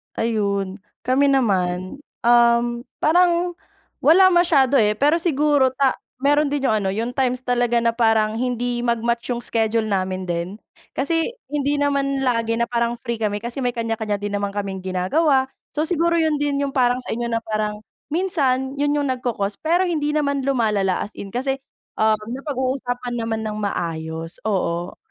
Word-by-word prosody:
Ayun. 200 -3 -1 0.2
Kami 260 +3 +3
naman, 190 -5 0 0.2
um, 235 0 +5 0.4
parang 350 +2 +3 0.5
wala 375 +5 +6
masyado, 295 -7 +4
eh. 210 -1 +3
Pero 295 +7 +3
siguro 295 -5 +2
ta 270 0 +2 0.2
meron 290 +1 +3
din 285 -1 -2
yung 220 - +3
ano, 200 -3 0
yung 230 +4 -2
times 255 -1 0
talaga 245 -1 +1
na 230 0 +2
parang 225 -2 +2
hindi 245 -1 -1
mag-match 235 0 -1
yung 235 - -4
schedule 225 -1 0
namin 185 -2 -1
din. 170 -1 -2 0.5
Kasi 325 +4 +1 0.2
hindi 290 -1 0
naman 275 -1 0
lagi 230 -2 +1
na 235 - +1
parang 235 0 0
free 235 -2 -3
kami 205 -1 0
kasi 240 +3 -4
may 245 - +1
kanya-kanya 225 -2 -2
din 205 0 -5
naman 200 0 -2
kaming 195 -2 -3
ginagawa. 260 - +2 0.3
So, 305 - +2
siguro 340 0 +1
'yon 315 -3 +1
din 290 -1 0
yung 275 - -5
parang 245 -1 +3
sa - - -3
inyo 235 +1 -3
na 230 - 0
parang 215 -1 -3 0.2
minsan 280 -7 0
'yon 290 0 +2
yung 290 - 0
nagko-cause, 225 -6 -3
pero 345 +4 +2
hindi 305 -4 -1
naman 280 -2 0
lumalala 215 -8 +1
as 210 - -12
in 200 - -8
kasi, 260 +5 -1 0.5
ah, 220 0 +4
napag-uusapan 255 -1 -3
naman 225 -2 -2
ng 215 0 -3
maayos. 165 -3 -4
Oo. 180 -4 -2
240 Hz, 165 wpm, -22 LUFS, 215-280 Hz, 0.5 s, wala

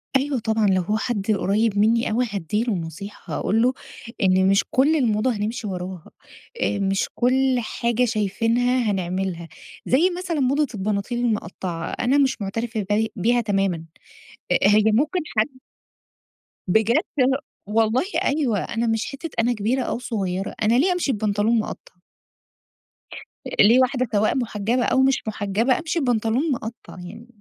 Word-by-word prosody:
أيوه 270 -1 +1
طبعًا، 220 -1 +1
لو 185 -1 +3
هو 210 +5 -1
حد 220 -2 -1
قريب 205 +1 +1
منّي 225 +3 +3
أوي 245 +3 +1
هادّي 205 +2 -1
له 235 -2 -1
نصيحة، 175 +3 -7
هاقول 220 +3 +1
له 250 +2 +3 0.5
إن 190 0 +4
مش 195 0 +4
كل 285 +5 +3
الموضة 240 -3 +1
هنِمشي 220 +1 -3
وراها، 180 -2 -6 0.5
آآ 205 - 0
مش 195 0 0
كل 260 +1 +2
حاجة 235 +1 0
شايفينها 230 +2 +1
هنعملها، 185 -2 -3 0.4
زي 310 +9 +3
مثلًا 355 -4 -3
موضة 280 +3 +2
البناطيل 205 +4 -2
المقطعة، 185 -7 -3
أنا 255 +3 +1
مش 270 -5 +1
معترفة 220 +1 -3
بي 220 +1 +1
بيها 240 +4 +2
تمامًا، 195 -6 0 0.7
أ - - +4
هي 210 +1 +5
ممكن 300 - +1 0.2
حد 215 - +4 1.2
بجد 220 +5 +3 0.2
ه 265 +1 +3 0.3
والله 225 +4 +2 0.2
أيوه، 275 -8 +1
أنا 230 +1 -2
مش 225 0 0
حتة 275 +4 -6
أنا 240 +2 +2
كبيرة 235 +4 0
أو 235 - -3
صغيرة، 195 -6 -3
أنا 215 +2 +3
ليه 360 +7 +3
أمشي 355 -6 0
ببنطلون 215 +1 +1
مقطع؟ 215 - -6 1.7
ليه 230 +5 +7
واحدة 255 0 +1
سواء 210 +4 +2
محجبة 235 0 -1
أو 260 - +2
مش 265 -4 +1
محجبة، 215 +4 0
أمشي 330 +1 -2
ببنطلون 245 +2 0
مقطع 235 -2 -6
يعني؟ 195 +7 -10
225 Hz, 145 wpm, -23 LUFS, 200-250 Hz, 1.7 s, ليه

